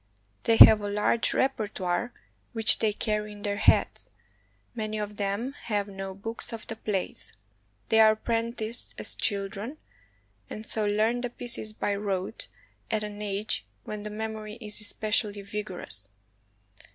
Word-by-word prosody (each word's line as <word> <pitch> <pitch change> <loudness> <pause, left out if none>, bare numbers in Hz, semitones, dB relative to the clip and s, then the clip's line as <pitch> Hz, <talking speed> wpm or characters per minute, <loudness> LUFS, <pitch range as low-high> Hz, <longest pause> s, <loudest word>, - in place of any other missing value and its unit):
They 230 - +4
have 215 -1 +10
a 205 - -3
large 210 +3 +1
repertoire 210 -5 -1
8s - - -19
CHINA - - -28 0.3
which 225 -2 +4
they 220 - +2
carry 210 0 -2
in 205 -1 -12
their 205 -1 -1
heads. 215 - +2 0.6
Many 215 -2 -3
of 210 -1 -5
them 205 +6 -2
have 205 -2 -1
no 195 -1 -7
books 225 +4 -6
of 225 -1 -7
the 225 - -5
plays. 205 -4 -3 0.6
They 220 - +4
are 220 -1 +7
apprenticed 230 +1 +2
as - - -3
children, 205 +6 -2 0.7
and 215 - -7
so 215 -1 +1
learn 220 +4 +1
the 245 - -3
pieces 240 -2 +2
by 205 - -1
rote 200 0 -3 0.4
at 215 -1 -1
an 210 0 -6
age 205 +1 -2 0.2
when 210 -1 -6
the 210 - -6
mem 220 +1 -4
ory 215 0 -8
is 215 -2 0
especially 210 -1 +1
vigorous. 190 - -4
210 Hz, 155 wpm, -27 LUFS, 205-225 Hz, 0.7 s, have